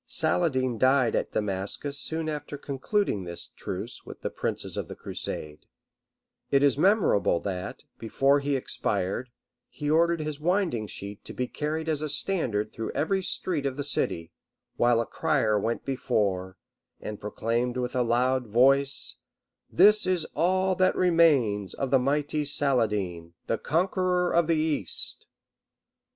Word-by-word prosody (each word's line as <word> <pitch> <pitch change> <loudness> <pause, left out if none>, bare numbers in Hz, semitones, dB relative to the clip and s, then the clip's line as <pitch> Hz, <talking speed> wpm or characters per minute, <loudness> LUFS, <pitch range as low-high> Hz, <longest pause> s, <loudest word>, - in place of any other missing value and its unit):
] - - -55 0.2
Saladin 130 -8 +1
died 130 -2 +3
at - - -1
Damascus 105 +8 -2
soon 160 +1 -2
after 150 -1 -4
concluding 140 - -1
this 85 -1 -6
truce - - -6
with - - -11
the - - -3
princes - - -3
of - - -3
the - - -8
crusade; 75 0 -6 0.8
it 140 0 +3
is 140 -3 +4
memorable 175 - +3
that, 95 0 -5 0.2
before 135 +5 +2
he 140 0 -1
expired, 105 -2 -2 0.4
he 150 0 -3
ordered 170 +1 +3
his 155 -1 -4
winding 170 - 0
sheet 100 0 -8
to - - -8
be 125 - -2
carried 155 +4 -3
as 155 -2 0
a 155 - -2
standard 125 - 0
through 115 - -4
every 190 +5 0
street 175 -4 -1
of 135 0 -4
the 145 - -2
city; 85 - -1 0.4
while 120 -1 +3
a 115 - 0
crier 130 -11 +1
went 115 +3 -2
before, 100 -8 -1 0.4
and 105 -1 -7
proclaimed 115 +4 -1
with 125 0 -3
a 125 - +2
loud 125 +1 +1
voice, 135 +5 +2 0.5
"This 210 +3 +6
is 180 -4 +1
all 185 +2 +2
that 185 0 +3
remains 140 - +3
to - - -1
the 135 0 +3
mighty 145 +3 0
Saladin, 105 - 0
the 115 - -1
conqueror 180 +2 +1
of 170 -1 +3
the 165 - +3
East." 155 -1 -2
135 Hz, 150 wpm, -27 LUFS, 110-160 Hz, 0.8 s, This